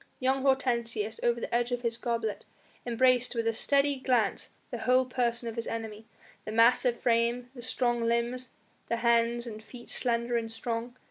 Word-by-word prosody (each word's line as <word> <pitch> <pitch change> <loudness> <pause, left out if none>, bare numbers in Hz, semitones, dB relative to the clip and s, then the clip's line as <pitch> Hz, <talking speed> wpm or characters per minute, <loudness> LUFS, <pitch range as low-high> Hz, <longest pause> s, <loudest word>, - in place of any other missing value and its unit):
Young 265 +1 +1
Hortensius, 235 -5 0
over 235 0 +1
the - - -5
edge 240 +1 +1
of 245 0 -2
his 230 -1 0
goblet, 230 -3 -2 0.4
embraced 250 +1 +3
with 230 -1 -1
a 230 - +2
steady 280 +4 +3
glance 245 -5 0 0.2
the - - -4
whole 255 +1 +3
person 240 -2 0
of 230 - -4
his 230 -1 -4
enemy 220 -1 -6 0.4
the - - -6
massive 235 +2 +4
frame, 240 +1 +1
the 245 - -10
strong 240 0 0
limbs, 235 +2 0 0.4
the 235 - 0
hands 235 0 +2
and 220 -2 -8
feet 240 +2 -12
slender 235 -1 0
and 225 -1 -3
strong. 230 +2 -4
235 Hz, 175 wpm, -29 LUFS, 230-250 Hz, 0.4 s, massive